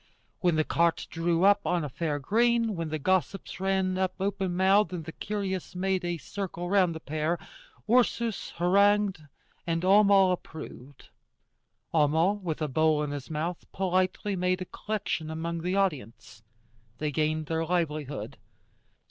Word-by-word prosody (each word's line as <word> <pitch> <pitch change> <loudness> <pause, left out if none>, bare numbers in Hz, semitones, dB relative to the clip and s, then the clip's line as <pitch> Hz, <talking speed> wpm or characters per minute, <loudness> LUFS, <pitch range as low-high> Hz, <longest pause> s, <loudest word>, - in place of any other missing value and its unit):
When 175 -3 +2
the 155 - +3
cart 170 +1 +1
drew 170 +1 0
up 200 +1 +5
on 175 -2 0
a - - -2
fair 150 +2 -2
green, 230 - +2
when 165 -2 -3
the 155 - -2
gossips 185 +5 -1
ran 190 -1 0
up 190 -1 0
open 195 -2 -1
mouthed 195 +1 +4
and 165 -3 -5
the 160 - -6
curious 190 -1 -4
made 190 0 0
a 175 -1 -2
circle 175 +1 -5
round 185 -4 +3
the - - -5
pair, 155 +3 -1 0.5
Ursus 235 -2 +1
harangued 200 -1 +3 0.4
and 165 0 0
Homo 195 -1 +5
approved. 145 -6 -8 0.8
Homo, 160 +4 +3
with 180 -7 -4
a - - 0
bowl 155 +2 +2
in 145 - -3
his 145 -3 -6
mouth, 165 +3 -4
politely 185 +2 0
made 180 0 0
a 185 - -4
collection 205 -6 -3
among 165 +1 -3
the 180 +3 -1
audience. 115 - -2 0.6
They 150 +2 -2
gained 155 +1 0
their 160 +1 -1
livelihood. 155 -4 -2
175 Hz, 150 wpm, -28 LUFS, 155-195 Hz, 0.8 s, up